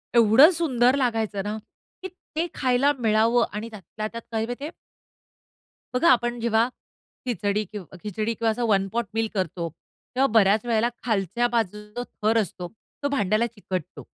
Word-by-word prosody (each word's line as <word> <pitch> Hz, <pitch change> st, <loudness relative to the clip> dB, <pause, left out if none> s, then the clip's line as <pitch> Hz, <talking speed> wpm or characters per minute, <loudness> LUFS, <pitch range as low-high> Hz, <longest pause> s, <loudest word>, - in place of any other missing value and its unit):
एवढं 235 Hz, -, +7 dB
सुंदर 260 Hz, -7 st, +2 dB
लागायचं 225 Hz, -6 st, 0 dB
ना, 210 Hz, +1 st, -3 dB, 0.5 s
की -, -, -2 dB, 0.3 s
ते 330 Hz, +2 st, 0 dB
खायला 260 Hz, +2 st, +3 dB
मिळावं 230 Hz, +1 st, +3 dB
आणि 215 Hz, +2 st, -4 dB
त्यातल्या 215 Hz, +1 st, -6 dB
त्यात 230 Hz, 0 st, -6 dB
काय 225 Hz, -1 st, 0 dB
माहिती 245 Hz, +4 st, -6 dB
आहे? 310 Hz, -, -4 dB, 1.2 s
बघा, 290 Hz, +7 st, +4 dB
आपण 240 Hz, 0 st, +1 dB
जेव्हा 230 Hz, 0 st, +2 dB, 0.6 s
खिचडी 210 Hz, -4 st, 0 dB
किंव 205 Hz, -4 st, -7 dB, 0.2 s
खिचडी 215 Hz, +2 st, -2 dB
किंवा 230 Hz, +1 st, -1 dB
1 195 Hz, -4 st, +2 dB
पॉट 235 Hz, 0 st, 0 dB
मील 225 Hz, 0 st, 0 dB
करतो, 175 Hz, -3 st, -2 dB, 0.5 s
तेव्हा 270 Hz, +2 st, +4 dB
बऱ्याच 210 Hz, 0 st, +4 dB
वेळेला 235 Hz, 0 st, +2 dB
खालच्या 225 Hz, +1 st, 0 dB
बाजूचा 210 Hz, 0 st, -2 dB, 0.2 s
थर 220 Hz, +2 st, +3 dB
असतो, 180 Hz, -2 st, -6 dB, 0.4 s
तो -, -, +2 dB
भांड्याला 215 Hz, -4 st, +1 dB
चिकटतो. 190 Hz, -7 st, -6 dB
225 Hz, 150 wpm, -25 LUFS, 210-240 Hz, 1.2 s, एवढं